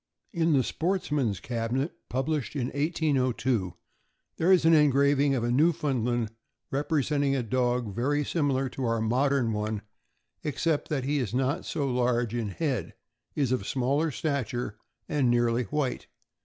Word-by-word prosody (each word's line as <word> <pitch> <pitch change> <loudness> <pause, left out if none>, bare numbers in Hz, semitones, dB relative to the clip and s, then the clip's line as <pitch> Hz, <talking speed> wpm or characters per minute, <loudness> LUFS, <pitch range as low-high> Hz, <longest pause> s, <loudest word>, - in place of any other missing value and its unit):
In 165 -2 +2
the 135 -3 +4
Sportsman's 150 - -1
Cabinet, 125 +5 -2 0.2
published 140 +2 -2
in 130 -3 -1
1802, 130 - 0 0.6
there 170 +4 +3
is 185 -3 +5
an 165 - +6
engraving 140 -1 +4
of 120 - -1
a 120 - 0
Newfoundland, 125 -6 +1 0.4
representing 145 0 +1
a 130 - 0
dog 120 -2 0
very 145 +6 0
similar 135 -5 0
to 130 - -5
our 115 -1 +1
modern 125 +1 +1
one, 105 0 -2 0.6
except 155 +1 -1
that 140 -4 -1
he 145 +2 0
is 120 -3 -2
not 135 +7 0
so 145 -4 -1
large 120 -2 +1
in 115 -3 -2
head, 125 - -2 0.4
is 135 -4 +1
of 115 -6 -1
smaller 140 +5 +1
stature, 125 -7 -2 0.3
and 140 -4 +1
nearly 120 0 +2
white. 145 -2 -2
135 Hz, 140 wpm, -28 LUFS, 120-145 Hz, 0.6 s, an